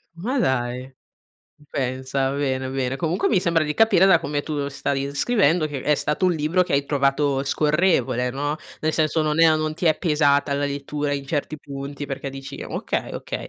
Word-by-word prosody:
Ma 245 +10 -2
dai. 125 - 0 0.7
Uh, 150 - -22
pensa, 130 0 -1
bene, 130 -2 -1
bene. 130 0 -2
Comunque 165 +5 0
mi 200 - +3
sembra 170 -3 +2
di 150 -1 -2
capire 205 -4 +5
da 190 -3 +6
come 145 -1 -3
tu 145 -2 -3
stavi 140 -1 -2
inscrivendo, 155 - +2
che 140 -3 -5
è 150 - +3
stato 150 +5 -1
un 180 - +4
libro 160 +3 +1
che - - -5
hai 140 0 +2
trovato 140 -1 +1
scorrevole, 150 -4 +1
no: 145 +4 -2 0.2
nel 155 0 0
senso, 155 0 +1
non 155 +1 +1
è - - +7
a 160 -1 +6
non 155 0 -1
ti 175 - -2
è 155 - +4
pesata 145 -4 +2
la 140 +1 0
lettura 145 +1 -3
in 140 -1 -3
certi 155 +1 -2
punti, 140 +1 -7
perché 135 0 -5
dici: 135 0 -8
“Okay, - - -3
okay”, - - -6
145 Hz, 195 wpm, -23 LUFS, 135-155 Hz, 0.7 s, è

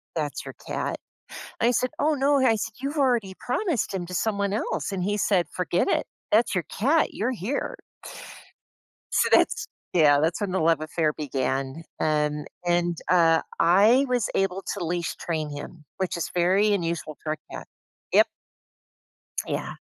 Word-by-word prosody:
That's - - -2
your - - -8
cat." - - -2 0.6
I 240 +2 +4
said, 255 +1 +1
"Oh, 305 +1 +2
no." 280 +1 +3
I 225 - +5
said, 210 - -4
"You've 280 +3 -3
already 235 -8 +2
promised 265 - 0
him 175 -2 -3
to 180 - -7
someone 200 0 0
else." 215 - -2
And 185 - -2
he 205 +1 0
said, 185 -4 +2
"Forget 180 -1 0
it. - - +1 0.3
That's 220 -1 +4
your 180 - 0
cat. 295 +9 +2
You're 245 +5 -1
here." 255 - -3 1.4
So - - +3
that's - - +3 0.3
Yeah, 145 -4 +5
that's 165 +4 0
when 200 -2 -1
the 190 - +1
love 165 -1 +3
affair 155 -1 0
began, 135 0 -2 0.2
and 150 -1 0 0.2
and, 175 -1 +1
uh, 165 -2 +5 0.2
I 210 +10 +5
was 245 -3 +1
able 195 0 0
to - - -4
leash 170 0 -2
train 155 -3 -3
him, 150 +2 -8
which 190 -2 -2
is - - -3
very 190 +4 +3
unusual 170 -4 -3
for 155 - -1
a - - -2
cat. - - -7 0.5
Yep. - - +6 1.2
Yeah. - - -3
180 Hz, 165 wpm, -25 LUFS, 165-225 Hz, 1.4 s, Yep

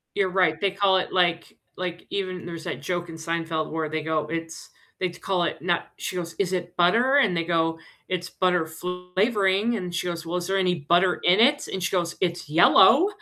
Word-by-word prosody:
You're 195 -2 +1
right, 180 -4 +2
they 200 - +2
call 195 0 +2
it 185 - -3
like 175 -2 0 0.2
like, 180 -1 -5
even 185 -3 -4
there's 170 -2 -7
that - - -5
joke 175 -1 -3
in 165 - -8
Seinfeld 165 -1 -3
where 160 -1 -2
they 155 0 -3
go, 155 -1 -1
"It's" 165 +1 -6 0.3
they 185 - +1
call 180 +1 -2
it - - -3
not 175 -1 0
she 185 - -5
goes, 170 -2 -5
"Is 190 -2 0
it 175 -1 -4
butter?" 230 +10 +3
And 220 -10 +3
they 165 - 0
go, 165 -1 0 0.3
"It's 180 -1 -3
butter 180 -3 +1
flavoring." 190 +5 0
And 180 -4 -5
she 175 - -2
goes, 170 -1 -4
"Well, 170 +2 -2
is 175 -1 -3
there 195 0 +1
any 180 -2 +2
butter 175 +5 +3
in 185 +4 +4
it?" 285 +5 +4
And 190 - -3
she 170 - 0
goes, 175 -2 -1
"It's 175 -4 -2
yellow." 190 - +6
180 Hz, 215 wpm, -24 LUFS, 165-190 Hz, 0.3 s, yellow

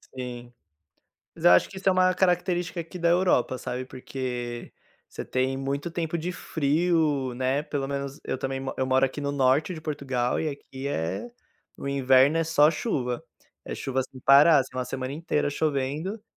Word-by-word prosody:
Sim 120 -1 -7 0.8
mas - - -10
eu - - +8
acho 90 - +5
que 190 - -12
isso 195 - 0
é 190 - +5
uma 185 0 +3
característica 180 -1 0
aqui 170 +2 -6
da 170 -1 +1
Europa, 170 -8 +2
sabe, 125 +1 -4
porque 125 -2 -5 0.4
você - - -7
tem 130 +1 -1
muito 140 +4 -3
tempo 165 0 -2
de 170 +2 -3
frio, 155 -5 0
né, 130 +2 0
pelo 140 -3 -3
menos 140 0 -4
eu - - -3
também 135 0 -3
mo 135 - -4
eu 130 - +1
moro 130 +1 +3
aqui 135 +2 -3
no 140 0 -2
norte 140 +5 +2
de 160 - -8
Portugal 135 -5 -1
e 160 - -1
aqui 140 -1 -7
é 140 - -2 0.5
o - - -5
inverno 135 +2 +4
é 165 - +1
só 155 -1 +5
chuva, 125 - -2 0.4
é - - -5
chuva 135 -1 -2
sem 130 - -13
para, 145 +4 +7
assim, 130 -1 -3
uma 130 - -1
semana 130 +1 -4
inteira 150 -1 -1
chovendo. 155 +8 -2
140 Hz, 185 wpm, -26 LUFS, 130-165 Hz, 0.8 s, eu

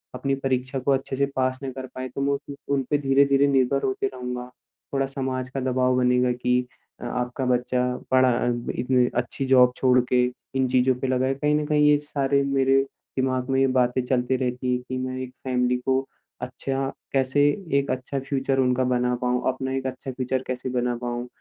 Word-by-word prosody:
अपनी 135 +2 -1
परीक्षा 135 0 -1
को 130 +2 0
अच्छे 135 0 0
से 140 +1 +2
पास 130 0 0
ना 135 - -3
कर 130 0 -7
पाया 130 0 -4
तो - - -2
मैं 140 +1 +1
उस 140 0 -6 0.2
उनपे 135 +2 0
धीरे-धीरे 140 0 +3
निर्भर 135 0 +2
होते 130 0 0
रहूँगा। 125 -1 -5 0.5
थोड़ा 135 0 +1
समाज 130 -1 -3
का 135 - -4
दबाव 130 0 +1
बनेगा 125 0 +3
कि 125 0 +1 0.4
अ, - - -6
आपका 125 +2 -2
बच्चा 125 0 +1 0.3
पढ़ा 130 0 +5
अ, - - 0 0.3
इतनी 125 0 +2
अच्छी 125 +3 -2
जॉब 125 -1 +5
छोड़ 125 -1 +4
के 125 -1 +4 0.3
इन 130 -1 +2
चीज़ों 130 +1 +3
पे 135 - 0
लगा 130 0 +1
है। 135 - +1
कहीं 150 +2 +1
न 150 0 0
कहीं 150 -1 +3
ये 150 - +6
सारे 140 -1 +1
मेरे 135 -1 +3 0.4
दिमाग़ 130 0 0
में 135 - +2
ये 135 - +4
बातें 125 +1 +1
चलती 125 0 +1
रहती 125 0 -1
है - - +2
कि 130 - -2
मैं 130 0 -3
एक 125 - -8
फ़ैमिली 125 -1 +1
को 130 0 +1 0.4
अच्छा 135 0 -3 0.2
कैसे 135 +1 +2 0.4
एक 140 - -2
अच्छा 130 +2 -3
फ्यूचर 135 0 -1
उनका 130 0 +2
बना 125 0 +1
पाऊँ, 125 0 +1
अपना 130 0 -4
एक 135 0 -3
अच्छा 130 +1 -5
फ्यूचर 130 0 -2
कैसे 130 0 -3
बना 120 0 0
पाऊँ। 120 0 -3
130 Hz, 200 wpm, -24 LUFS, 125-135 Hz, 0.5 s, ये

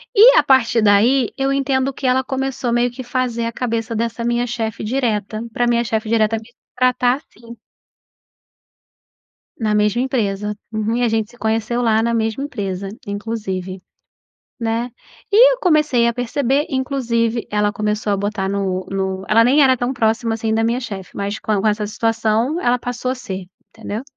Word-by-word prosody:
E - - +8
a - - +6
partir 240 -3 +3
daí 220 +5 +4
eu 270 0 0
entendo 270 -1 0
que 265 - -3
ela 255 +1 +2
começou 265 -1 -2
meio 240 +1 +2
que 255 +2 -8
fazer 240 -2 -2
a 230 - -2
cabeça 230 -1 -3
dessa 230 +1 -2
minha 240 +1 0
chefe 225 -2 -3
direta, 215 -3 -1
pra 240 +2 0
minha 235 0 +2
chefe 220 -1 -2
direta 225 0 +2
me 220 +1 -11 0.3
tratar 250 -1 +2
assim. 235 -5 -15 2.0
Na 220 -2 0
mesma 210 +3 +2
empresa, 210 -5 -1 0.2
uhum 220 +1 -1
e 245 - 0
a 240 - +3
gente 220 -1 -1
se 240 - -19
conheceu 225 +2 -1
lá 225 -2 +2
na 235 +1 0
mesma 225 +2 -1
empresa 200 -8 -4 0.2
inclusive, 200 -3 -4 0.8
né, 230 +1 -1 0.4
e - - +7
eu - - -10
comecei 300 - +3
a 235 - +2
perceber 265 +4 0
inclusive 240 -4 -1
ela 210 0 +1
começou 210 -1 -1
a - - +2
botar 200 0 -2
no 190 -2 -2
no 190 -1 -2
ela 225 +2 +5
nem 275 +5 +5
era 260 -1 +5
tão 245 +1 -1
próxima, 225 -1 +1
assim, 225 0 -2
da 225 - +1
minha 235 +2 0
chefe, 195 -8 -7
mas 200 0 -2
c - - -11
com 210 -1 0
essa 210 0 +1
situação, 225 +7 0
ela 245 -3 +2
passou 245 +1 -3
a - - 0
ser, 190 -7 -6 0.2
entendeu? 225 0 -6
230 Hz, 175 wpm, -19 LUFS, 215-250 Hz, 2.0 s, E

